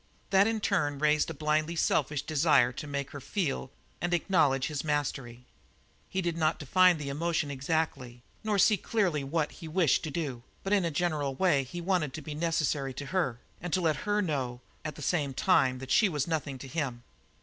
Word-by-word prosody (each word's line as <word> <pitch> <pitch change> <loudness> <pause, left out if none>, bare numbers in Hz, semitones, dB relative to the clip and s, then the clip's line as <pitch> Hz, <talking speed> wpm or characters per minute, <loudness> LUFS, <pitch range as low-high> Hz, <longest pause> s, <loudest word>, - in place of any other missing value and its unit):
That 195 +1 +5
in 225 -1 0
turn 150 -9 +1
raised 150 +2 +2
a - - -4
blindly 155 +2 0
selfish 150 -3 +1
desire 150 -5 +3
to 140 +4 -7
make 140 -1 -3
her 145 - -7
feel 145 -4 -2 0.3
and 175 +1 +1
acknowledge 150 -8 +2
his 150 -2 -3
mastery. 135 -5 -2 0.6
He 190 0 -1
did 170 -1 -1
not 155 0 +2
define 180 +4 +4
the 145 -2 -5
emotion 160 0 -1
exactly, 135 -4 -2 0.2
nor 215 -2 +1
see 210 +2 +5
clearly 180 -8 0
what 150 +2 -1
he 165 - -10
wished 160 -3 +2
to - - -3
do, 140 -6 -3 0.2
but 195 - 0
in 195 -4 +3
a - - +1
general 150 -4 -1
way 150 -5 +3
he 175 +7 -7
wanted 170 -6 0
to 160 - -6
be 150 - -6
necessary 150 -4 -1
to 140 - -5
her, 135 -11 0 0.2
and 175 -1 -5
to 185 - +2
let 160 -4 +2
her 210 +6 0
know 130 -7 -2 0.2
at 155 - -5
the 150 - -8
same 145 -6 0
time 130 0 +3
that 135 +1 -7
she 215 -2 +5
was 150 -4 -1
nothing 150 -5 -2
to 135 - -9
him. 130 -5 -3
150 Hz, 200 wpm, -29 LUFS, 140-175 Hz, 0.6 s, That